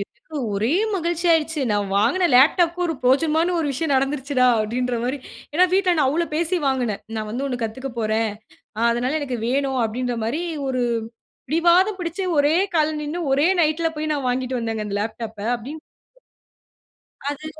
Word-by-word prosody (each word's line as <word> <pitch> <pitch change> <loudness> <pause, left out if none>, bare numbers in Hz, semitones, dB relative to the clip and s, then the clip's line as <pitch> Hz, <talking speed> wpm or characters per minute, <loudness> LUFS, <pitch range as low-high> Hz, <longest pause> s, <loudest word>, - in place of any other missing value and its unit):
எனக்கு 235 +9 -11 0.2
ஒரே 220 +9 +1 0.2
மகிழ்ச்சி 345 -1 -1
ஆயிடுச்சு. 320 -1 +1
"நான் 205 -1 0
வாங்கின 360 - +2
லேப்டாப்க்கும் 340 +7 +4
ஒரு 325 - -2
பிரோஜனமான 315 +7 +2
ஒரு 325 - 0
விஷயம் 290 +2 -1
நடந்துருச்சுடா!" 270 -1 +1
அப்படீன்ற 240 +3 -1
மாரி. 260 +4 -2 0.3
ஏன்னா, 350 +5 +5
வீட்ல 375 -2 +3
நான் 295 -4 +3
அவ்வளோ 335 +5 0
பேசி 340 +3 +1
வாங்குனேன். 250 -6 0 0.2
"நான் 215 -1 -3
வந்து 250 +5 -3
ஒண்ணு 250 -2 -3
கத்துக்க 260 +5 -4
போறேன். 220 0 0 0.5
அ - - -1
அதனால 250 +6 -1
எனக்கு 260 -4 -3
வேணும்." 270 0 0
அப்படீன்ற 245 +2 -2
மாரி, 270 +10 -2 0.2
ஒரு 255 -2 -1 0.7
பிடிவாதம் 345 +6 +3
பிடிச்சு 350 +2 -3
ஒரே 290 +3 +4 0.2
கால்ல 310 -1 +2
நின்னு 300 +4 -4
ஒரே 285 +4 +3
நைட்ல 320 +1 +2
போய் 310 0 -2
நான் 280 -3 -2
வாங்கிட்டு 255 0 -1
வந்தேங்க 225 -2 -3
அந்த 205 -1 -3
லேப்டாப்ப. 220 0 -5 0.2
அப்படீன்னு 285 +7 -9 1.5
அது 290 +2 -5
275 Hz, 160 wpm, -22 LUFS, 245-320 Hz, 1.5 s, ஏன்னா